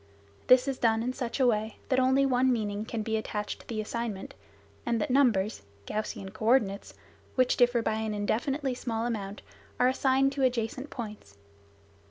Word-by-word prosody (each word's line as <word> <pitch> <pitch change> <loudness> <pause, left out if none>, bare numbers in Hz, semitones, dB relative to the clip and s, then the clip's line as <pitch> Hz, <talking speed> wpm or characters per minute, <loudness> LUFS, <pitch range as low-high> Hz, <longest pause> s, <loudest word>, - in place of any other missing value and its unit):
This 255 +1 +6
is 270 -2 -2
done 225 -1 +2
in 250 +2 -1
such 255 0 -4
a 260 - +4
way, 220 -2 +1
that 260 - +3
only 265 +2 +4
one 260 0 +3
meaning 210 -3 -1
can 225 -1 -3
be 220 0 0
attached 210 -1 -4
to - - -17
the 220 -2 -2
assignment, 215 -3 -4 0.5
and 235 -1 0
that 300 - -1
numbers 225 - +2 0.2
(Gaussian 200 - -4
coordinates) 215 -2 +1 0.4
which 255 -1 +3
differ 245 -1 +3
by 220 -1 0
an 220 -1 -2
indefinitely 265 +7 -1
small 230 -2 -3
amount 205 -4 -4 0.4
are 250 - +5
assigned 265 +1 +2
to 275 0 -4
adjacent 255 +2 0
points. 210 - -8
235 Hz, 170 wpm, -29 LUFS, 215-255 Hz, 0.5 s, This